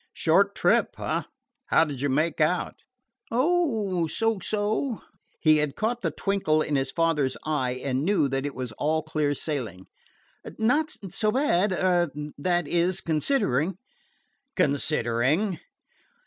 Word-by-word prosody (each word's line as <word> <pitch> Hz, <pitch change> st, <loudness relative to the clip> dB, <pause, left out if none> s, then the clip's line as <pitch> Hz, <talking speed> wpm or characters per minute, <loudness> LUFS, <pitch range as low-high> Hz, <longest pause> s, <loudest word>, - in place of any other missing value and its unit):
"Short -, -, +3 dB
trip, -, -, +2 dB
eh? -, -, -1 dB, 0.5 s
How -, -, +4 dB
did 140 Hz, -4 st, -6 dB
you 145 Hz, -, 0 dB
make 155 Hz, +4 st, 0 dB
out?" 170 Hz, +4 st, 0 dB, 0.4 s
"Oh, 230 Hz, -, +1 dB
so 225 Hz, +5 st, 0 dB
so." 215 Hz, +5 st, -1 dB, 0.4 s
He 155 Hz, -2 st, +5 dB
had 150 Hz, -2 st, 0 dB
caught 235 Hz, +2 st, -1 dB
the -, -, 0 dB
twinkle 175 Hz, -6 st, 0 dB
in 150 Hz, -, -2 dB
his 135 Hz, -1 st, 0 dB
father's 165 Hz, -5 st, +1 dB
eye 130 Hz, -5 st, -1 dB
and 130 Hz, -1 st, 0 dB
knew 190 Hz, -4 st, +2 dB
that 135 Hz, 0 st, -2 dB
it 145 Hz, -1 st, -4 dB
was 125 Hz, -2 st, -5 dB
all 155 Hz, +1 st, +1 dB
clear 150 Hz, -2 st, -1 dB
sailing. 120 Hz, -, -4 dB, 0.7 s
"Not 295 Hz, +8 st, +2 dB, 0.2 s
so 215 Hz, +4 st, 0 dB
bad 210 Hz, -7 st, +2 dB
er 175 Hz, -2 st, +2 dB, 0.3 s
that 175 Hz, 0 st, +1 dB
is, 175 Hz, +3 st, +1 dB
considering." 160 Hz, -, 0 dB, 0.8 s
"Considering?" 150 Hz, -, +1 dB
165 Hz, 135 wpm, -26 LUFS, 145-205 Hz, 0.8 s, He